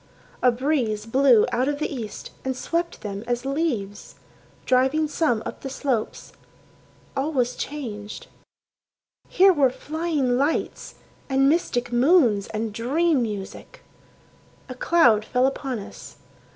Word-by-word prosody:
A 250 Hz, -, +5 dB
breeze 240 Hz, -5 st, -1 dB
blew 250 Hz, -1 st, +4 dB
out 250 Hz, +2 st, +1 dB
of 290 Hz, 0 st, -1 dB
the 305 Hz, -, -3 dB
east 230 Hz, -6 st, -7 dB
and 260 Hz, -1 st, -3 dB
swept 340 Hz, +5 st, -2 dB
them 200 Hz, 0 st, -5 dB
as 245 Hz, +1 st, -2 dB
leaves, 270 Hz, -9 st, -3 dB, 0.5 s
Driving 265 Hz, +5 st, +2 dB
some 290 Hz, -8 st, 0 dB
up -, -, -7 dB
the 270 Hz, -, -5 dB
slopes.... 260 Hz, -4 st, -3 dB, 0.8 s
All 280 Hz, +4 st, -1 dB
was 250 Hz, -4 st, 0 dB
changed. 215 Hz, -8 st, -6 dB, 1.0 s
Here 380 Hz, +1 st, +5 dB
were 280 Hz, -5 st, +3 dB
flying 295 Hz, -2 st, -1 dB
lights, 290 Hz, +4 st, -2 dB, 0.3 s
and 270 Hz, 0 st, +3 dB
mystic 245 Hz, -6 st, 0 dB
moons, 240 Hz, -, +4 dB
and 220 Hz, 0 st, -4 dB
dream 285 Hz, +6 st, +1 dB
music. 205 Hz, -4 st, -6 dB, 0.8 s
A 255 Hz, -, -6 dB
cloud 255 Hz, -6 st, +3 dB
fell 250 Hz, +3 st, +1 dB
upon 270 Hz, -2 st, -2 dB
us. 200 Hz, -, -10 dB
255 Hz, 125 wpm, -24 LUFS, 230-295 Hz, 1.0 s, A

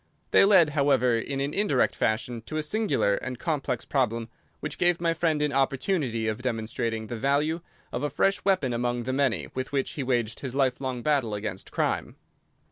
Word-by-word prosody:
They -, -, +7 dB
led, 190 Hz, -6 st, +6 dB
however, 140 Hz, -5 st, +3 dB
in 135 Hz, +4 st, -3 dB
an 140 Hz, +2 st, -2 dB
indirect 200 Hz, -11 st, +2 dB
fashion 115 Hz, +2 st, -1 dB
to 155 Hz, -, -4 dB
a 155 Hz, -, 0 dB
singular 190 Hz, -, +1 dB
and 130 Hz, -1 st, -5 dB
complex 135 Hz, -5 st, -2 dB
problem 115 Hz, -4 st, 0 dB, 0.3 s
which 155 Hz, -, -5 dB
gave 175 Hz, -1 st, +3 dB
my 170 Hz, -1 st, +1 dB
friend 160 Hz, -2 st, +1 dB
an 145 Hz, -1 st, 0 dB
opportunity 135 Hz, -, 0 dB
of 110 Hz, +2 st, -2 dB
demonstrating 115 Hz, -2 st, -2 dB
the 115 Hz, +1 st, -5 dB
value 150 Hz, +6 st, +1 dB, 0.3 s
of 120 Hz, -, -3 dB
a 145 Hz, -, 0 dB
fresh 195 Hz, +8 st, +1 dB
weapon 185 Hz, -11 st, +2 dB
among 120 Hz, 0 st, -1 dB
the 130 Hz, +2 st, -2 dB
many 135 Hz, -3 st, 0 dB
with 130 Hz, 0 st, -4 dB
which 135 Hz, -2 st, 0 dB
he 145 Hz, -, -4 dB
waged 120 Hz, -4 st, 0 dB
his 130 Hz, -2 st, -5 dB
life 135 Hz, -2 st, +1 dB
long 130 Hz, -3 st, -3 dB
battle 135 Hz, -8 st, +1 dB
against 100 Hz, -2 st, -5 dB
crime. -, -, -1 dB
130 Hz, 190 wpm, -27 LUFS, 120-150 Hz, 0.3 s, They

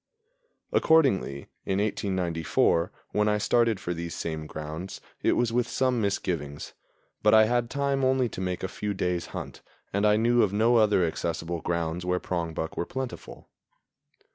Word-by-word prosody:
Accordingly, 130 Hz, -, +3 dB, 0.2 s
in 95 Hz, -, -1 dB
1894, 90 Hz, -4 st, +1 dB, 0.2 s
when 105 Hz, 0 st, +1 dB
I 105 Hz, -, +2 dB
started 115 Hz, -1 st, +2 dB
for 90 Hz, -, -3 dB
these 85 Hz, 0 st, -5 dB
same 80 Hz, -2 st, -4 dB
grounds, 80 Hz, +5 st, -6 dB, 0.2 s
it -, -, +3 dB
was 120 Hz, -1 st, +1 dB
with 120 Hz, 0 st, +1 dB
some 130 Hz, -2 st, +1 dB
misgivings; 85 Hz, -8 st, -2 dB, 0.5 s
but 105 Hz, +1 st, +5 dB
I 110 Hz, 0 st, +7 dB
had 120 Hz, +1 st, 0 dB
time 140 Hz, -1 st, 0 dB
only 130 Hz, -1 st, +3 dB
to 95 Hz, -, -7 dB
make 90 Hz, -1 st, -3 dB
a -, -, 0 dB
few 105 Hz, +2 st, -4 dB
days' 90 Hz, -2 st, -1 dB
hunt, -, -, -7 dB, 0.3 s
and 100 Hz, +1 st, +1 dB
I 105 Hz, 0 st, +4 dB
knew 120 Hz, +2 st, +3 dB
of 100 Hz, -, +2 dB
no 115 Hz, +3 st, +4 dB
other 105 Hz, -5 st, +4 dB
accessible 85 Hz, +1 st, -3 dB
grounds 85 Hz, +1 st, -2 dB
where 90 Hz, 0 st, 0 dB
prongbuck 85 Hz, -3 st, -3 dB
were 85 Hz, -, -1 dB
plentiful. 130 Hz, -2 st, -6 dB
95 Hz, 160 wpm, -27 LUFS, 85-115 Hz, 0.5 s, I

